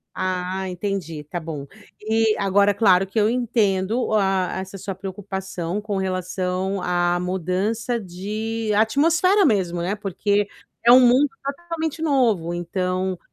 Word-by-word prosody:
Ah, 185 +1 -2
entendi, 180 -4 -4
tá 175 +4 -5
bom. 150 -4 -6 0.3
E 220 0 +2
agora, 200 +1 +3
claro 195 -3 +4
que 195 +4 -2
eu 210 0 +3
entendo 225 -2 +1
o 220 - 0
a 195 -3 +1
essa 190 +1 -7
sua 195 0 -5
preocupação 190 -1 -5
com 205 -2 -3
relação 185 0 -2
à 175 0 +1
mudança 190 +7 -1
de 215 +4 -4
atmosfera 325 - +3
mesmo, 180 -8 +1
né, 190 +4 -1
porque 205 0 0 0.4
é 240 - +8
um 250 - +9
mundo 255 +3 +5
totalmente 320 +2 -4
novo. 230 - +1
Então, 185 +1 -2
195 Hz, 135 wpm, -22 LUFS, 185-225 Hz, 0.4 s, um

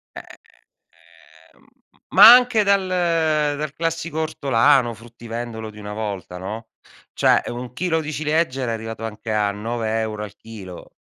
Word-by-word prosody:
Ehm, - - -8 1.3
ehm, - - -27 0.4
ma 210 +5 +10
anche 250 -3 +4
dal 200 -2 +2 0.7
dal 150 -1 -4
classico 165 -1 -3
ortolano, 135 -4 +2
fruttivendolo 115 0 -8
di 105 - -14
una 105 0 -7
volta 100 -4 -5
no, 110 +5 -7 0.4
cioè - - +3
1 120 +1 -7
chilo 160 +2 -1
di 155 0 -5
ciliegie 150 -2 -1
era 115 -2 -2
arrivato 110 0 -6
anche 110 0 -6
a 105 -1 +1
9 110 +1 -3
euro 110 -1 -4
al 105 0 -9
chilo, 100 -6 -11
115 Hz, 140 wpm, -21 LUFS, 110-155 Hz, 1.3 s, ma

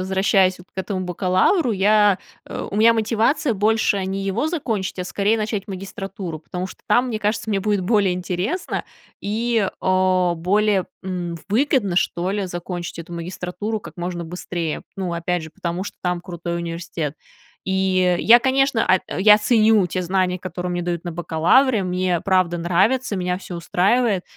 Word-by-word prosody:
возвращаясь 190 0 +2
вот 180 - -15
к - - -9
этому 190 0 -2
бакалавру, 185 - +2
я, 205 0 +4 0.3
э, - - -5
у - - -6
меня 225 +2 +6
мотивация 230 +4 +1
больше 210 -1 +1
не 195 +1 -3
его 210 +10 0
закончить, 225 - -3
а 180 - -2
скорее 205 +4 +1
начать 215 -2 -3
магистратуру, 195 -3 -6
потому 180 +3 -5
что - - -13
там, 245 +1 +4
мне 220 -3 -2
кажется, 215 +1 -1
мне 200 -2 +1
будет 205 0 +1
более 200 -1 +2
интересно 180 - -3 0.4
и, 220 0 0
а, 185 -1 +2
более, 195 +3 +1 0.2
м, 175 -2 -4
выгодно, 225 -3 +1
что 175 0 0
ли, 200 -1 -1
закончить 175 -1 -6
эту 170 +1 -8
магистратуру 180 +5 -4
как - - -12
можно 175 -1 -4
быстрее. 170 -1 -4
Ну, 185 -3 -3
опять 170 0 -1
же, 160 - -10
потому 170 +3 -4
что - - -8
там 180 -1 -1
крутой 170 -1 -5
университет. 170 -3 -4 0.5
И 190 -1 +2
я, 235 +5 +7
конечно, 265 -1 +2
ат 185 0 +3 0.2
я 210 +2 +7
ценю 215 -2 +4
те 180 +1 -3
знания, 185 0 0
которые 180 0 -5
мне 175 0 -2
дают 175 -1 -3
на 175 - -4
бакалавре, 180 +9 +3
мне, 180 -1 0
правда, 185 -3 +1
нравится, 200 +8 +1
меня 180 0 -1
всё 180 -2 -8
устраивает. 195 +4 +1
190 Hz, 165 wpm, -21 LUFS, 180-210 Hz, 0.5 s, я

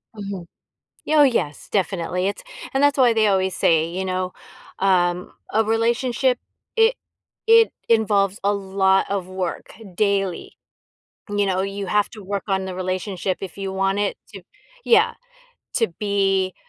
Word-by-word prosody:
Mhm. 200 -4 -6 0.6
Oh, 305 -1 +6
yes. 230 - 0
Definitely. 180 -1 -1
It's 200 - -4 0.3
and 270 - +1
that's 285 0 +4
why 250 -3 +5
they 220 -1 +3
always 190 -2 +1
say, 160 -1 +3
you 185 +3 -4
know, 185 0 -2 0.5
um, 180 -2 +1 0.2
a 220 +1 +3
relationship, 240 +3 +1 0.4
it 450 +2 +4 0.5
it 455 0 +6 0.2
involves 205 -3 +2
a 200 +1 +2
lot 195 -1 +2
of 195 -2 -2
work 185 -2 -5 0.2
daily. 195 -3 -1 0.7
You 205 0 +1
know, 190 -1 0
you 195 +1 -4
have 210 +2 +2
to 215 -3 -11
work 200 +1 -3
on 190 -1 0
the 190 - -5
relationship 185 0 -2
if 190 -2 -7
you 195 -1 -4
want 195 +1 0
it 205 -1 -1 0.2
to 195 - -9 0.4
Yeah, 450 0 +4 0.6
to 225 - +2
be 195 -2 +1
195 Hz, 145 wpm, -22 LUFS, 185-220 Hz, 0.7 s, Oh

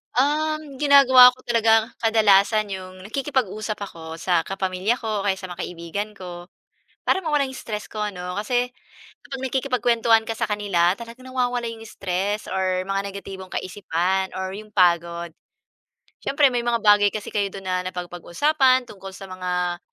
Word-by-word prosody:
Um, 300 +1 0
ginagawa 260 -3 +8
ko 255 - -20
talaga 225 -1 +3
kadalasan 215 -1 +3
yung 185 -1 -7
nakikipag-usap 220 -3 -2
ako 165 -4 -8
sa 175 +1 +1
kapamilya 190 +3 -1
ko 220 -4 -3
o - - -6
kaya 195 -1 +2
sa 185 -1 -9
mga 175 - -9
kaibigan 180 +5 -5
ko. 175 -2 -9 0.6
Para 380 - +2
mawala 300 -5 +1
yung 265 - -6
stress 210 -4 -5
ko 215 - -7
'no, 180 -2 -6
kasi 245 +3 0 0.5
kapag 270 -2 -8
nakikipagkwentuhan 240 -4 +2
ka 225 - -3
sa 225 0 -2
kanila 195 -4 +1
talaga 235 +2 -10
nawawala 250 -2 -2
yung 225 -1 -8
stress 200 0 -3
or 185 -1 -1
mga 195 0 -2
negatibong 190 -1 -9
kaisipan 185 0 -1
or 190 +1 -4
yung 215 0 -11
pagod. 170 -2 +2 0.9
Siyempre 280 -1 +3
may 245 - 0
mga 235 -2 +1
bagay 205 -1 +6
kasi 210 0 -6
kayo 205 -2 0
do'n 195 0 -10
na 185 -1 -1
napapag-usapan 255 - +1
tungkol 195 -1 -10
sa 195 - -9
mga, 180 -1 -2
205 Hz, 155 wpm, -23 LUFS, 185-245 Hz, 0.9 s, ginagawa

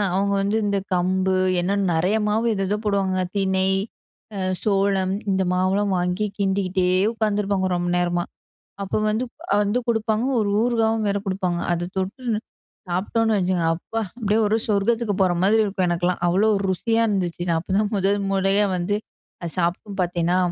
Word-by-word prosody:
அவங்க 200 +1 +1
வந்து, 200 +2 0
இந்த 200 -1 +1
கம்பு 185 +1 +1 0.3
என்ன 195 +3 0 0.2
நிறைய 180 +6 +1
மாவு 225 +3 +1
ஏதேதோ 195 +1 -1
போடுவாங்க. 195 -2 +1 0.2
திணை, 190 -1 +1 0.7
அ - - -4 0.2
சோளம் 195 -2 +1 0.2
இந்த 190 - +1
மாவெல்லாம் 190 +2 +1
வாங்கி 180 +4 0
கிண்டிகிட்டே 190 -2 +1 0.2
உட்காந்துருப்பாங்க, 205 -3 0
ரொம்ப 175 0 -1
நேரமா. 175 0 0 0.6
அப்போ 195 - -2
வந்து 220 +3 0 0.4
வந்து 205 +5 0
குடுப்பாங்க 220 0 0
ஒரு 205 -2 0
ஊறுகாவும் 225 -2 +1
வேற 200 0 +1
குடுப்பாங்க. 185 -2 -1
அத 175 0 -1
தொட்டு 195 +8 -3 0.7
சாப்ட்டோனு 220 +5 0
வச்சுங்க, 180 -2 0
அப்பா! 225 +6 -5 0.2
அப்டியே 215 -2 +1
ஒரு 210 +1 +2
சொர்க்கத்துக்கு 215 +1 +1
போற 185 -2 +3
மாதிரி 215 +4 +4
இருக்கும் 195 -2 -1
எனக்கெல்லா. 175 +1 0
அவ்ளோ 190 +5 +3 0.2
ருசியா 225 +5 +1
இருந்துச்சு. 180 -5 -1
நா 165 - +2
அப்போதான் 200 +5 0
முதல் 200 +1 +1
முறையா 195 +1 +2
வந்து 185 +4 -1 0.5
அது 170 - -4
சாப்ட்டு 185 +4 -2
பாத்தேனா, 175 0 0
195 Hz, 145 wpm, -23 LUFS, 185-210 Hz, 0.7 s, மாதிரி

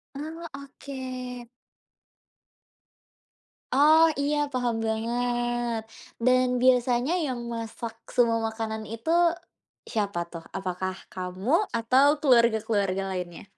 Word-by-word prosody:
Oh, 320 +4 -6
oke. 255 -3 -7 2.2
Oh, 305 +4 +6 0.2
iya 295 +1 +1
paham 245 -3 0
banget, 240 +1 -1 0.5
dan 255 0 +5 0.2
biasanya 250 +3 +3
yang 255 -3 -3
masak 230 0 -5 0.2
semua 235 -2 +4
makanan 220 -1 -4
itu, 230 +8 -6 0.8
siapa 200 -5 -1
tuh? 165 -1 -8
Apakah 185 0 -3 0.2
kamu? 185 +4 -5 0.3
Atau 255 +5 +4
keluarga-keluarga 220 - +3
lainnya? 180 -2 -5
240 Hz, 90 wpm, -26 LUFS, 220-255 Hz, 2.2 s, Oh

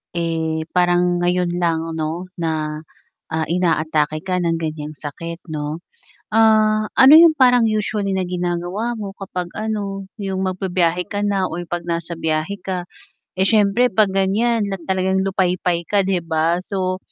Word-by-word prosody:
eh 160 -1 -1
parang 175 0 +2
ngayon 180 0 +1
lang 165 -2 +1 0.2
'no, 165 +4 -3
na, 155 -2 -2 0.5
ah 160 0 0
inaatake 155 -3 0
ka 185 -1 -1
ng 170 -1 0
ganyang 155 -1 -4
sakit 165 +4 -7
'no? 150 +2 -4 0.5
Ah, 215 -1 +4
ano 265 +2 +8
yung 335 -1 +8
parang 250 -5 +4
usually 210 -2 -1
na 190 - 0
ginagawa 180 +6 -2
mo 200 -2 -6
kapag 180 -2 -5
ano, 205 -3 -3 0.2
'yung 190 -1 -2
magbi-biyahe 180 -2 0
ka 205 0 -2
na 195 -2 0
o 170 - -5
yung 175 - -5
'pag 175 0 -2
nasa 170 0 -2
biyahe 160 +4 -2
ka, 180 -2 -4 0.5
eh, 190 - +3
siyempre 215 +3 +3
'pag 210 -1 +4
ganyan 205 +4 +1
lat 195 -3 -4
talagang 190 0 +1
lupaypay 180 -3 0
ka 200 +2 +2
'di 185 -3 -1
ba? 165 +1 +1
So, 185 -2 -2
180 Hz, 155 wpm, -20 LUFS, 165-200 Hz, 0.5 s, ano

